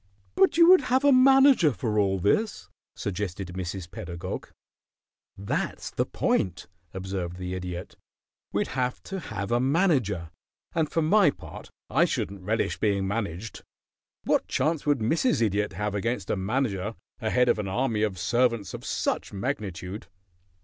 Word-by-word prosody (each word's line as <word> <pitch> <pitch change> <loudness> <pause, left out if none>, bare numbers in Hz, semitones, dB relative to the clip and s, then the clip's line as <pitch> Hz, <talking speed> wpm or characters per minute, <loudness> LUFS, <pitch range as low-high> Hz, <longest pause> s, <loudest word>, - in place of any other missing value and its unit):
"But 195 - +3
you 335 0 +7
would 370 +1 +8
have 260 +2 +1
a 285 - +6
manager 265 - +6
for 110 -4 -1
all 95 -1 +2
this," 205 - 0 0.3
suggested 95 -1 -4
Mrs. 90 -1 -5
Pedagog. 85 -1 -6 0.9
"That's 100 +1 -3
the - - -1
point," 90 -2 0 0.3
observed 95 -2 -4
the 90 0 -5
Idiot. 90 -1 -6 0.5
"We'd - - -1
have 125 -1 -2
to 195 - -5
have 105 - -5
a 120 - +3
manager, 130 - +1 0.4
and 160 -2 +1
for 165 - 0
my 195 +2 +5
part - - -9 0.2
I - - +3
shouldn't 100 -1 -3
relish 110 +4 -1
being 100 -3 +1
managed. 100 0 -4 0.6
What - - +1
chance 155 +2 0
would 145 -1 +4
Mrs. 160 - +2
Idiot 105 -2 0
have 105 -1 -2
against 115 +5 -2
a - - +1
manager 105 0 -1 0.2
ahead 125 +2 +2
of 110 - +2
an 105 - -3
army 115 +2 0
of 105 -4 0
servants 115 0 +1
of - - -7
such - - -2
magnitude? 100 - -4
105 Hz, 150 wpm, -27 LUFS, 95-140 Hz, 0.9 s, would